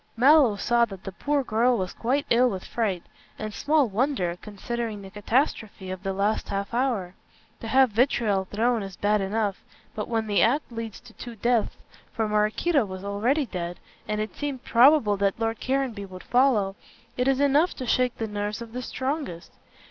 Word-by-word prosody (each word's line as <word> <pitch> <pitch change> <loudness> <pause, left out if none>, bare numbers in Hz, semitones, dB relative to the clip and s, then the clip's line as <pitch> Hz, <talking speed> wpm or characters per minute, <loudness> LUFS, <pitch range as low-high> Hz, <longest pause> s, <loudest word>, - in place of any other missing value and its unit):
Mallow 265 -3 +6
saw 235 +4 +2
that 195 -4 -11
the 195 - -6
poor 285 +8 -1
girl 240 +1 +2
was 185 -2 -3
quite 270 +5 -1
ill 245 +2 +5
with 190 -4 -5
fright; 200 -7 -2 0.3
and 215 -1 -5
small 295 +1 +2
wonder, 210 -5 0
considering 215 0 -5
the 190 - -10
catastrophe 210 -3 -1
of 185 -1 -6
the 195 0 -2
last 200 +3 -1
half 200 +2 -3
hour. 235 -8 0 0.5
To 225 - -7
have 260 +1 +4
vitriol 215 -4 +2
thrown 225 +4 0
is 195 -2 -7
bad 210 0 +1
enough, 200 0 -1 0.3
but 210 - -4
when 225 -1 -1
the 205 -2 +2
act 260 +4 +2
leads 230 -2 -6
to 245 -2 -16
two 240 0 -9
deaths 235 0 0 0.4
for 225 -2 -1
Maraquito 215 +8 +2
was 185 -2 -7
already 230 +9 0
dead, 175 -5 -5 0.3
and 210 0 -1
it 215 -3 -4
seemed 280 -4 -4
probable 240 -4 +5
that 200 +2 0
Lord 225 0 -1
Caranby 255 -6 -1
would 185 -1 -10
follow 240 -7 +2 0.4
it 250 +1 0
is 270 -1 +2
enough 285 +5 +3
to 255 - -5
shake 250 0 +1
the 225 - -2
nerves 205 0 -3
of 230 -1 -9
the 250 - -4
strongest. 260 - -4
225 Hz, 185 wpm, -26 LUFS, 200-255 Hz, 0.5 s, Mallow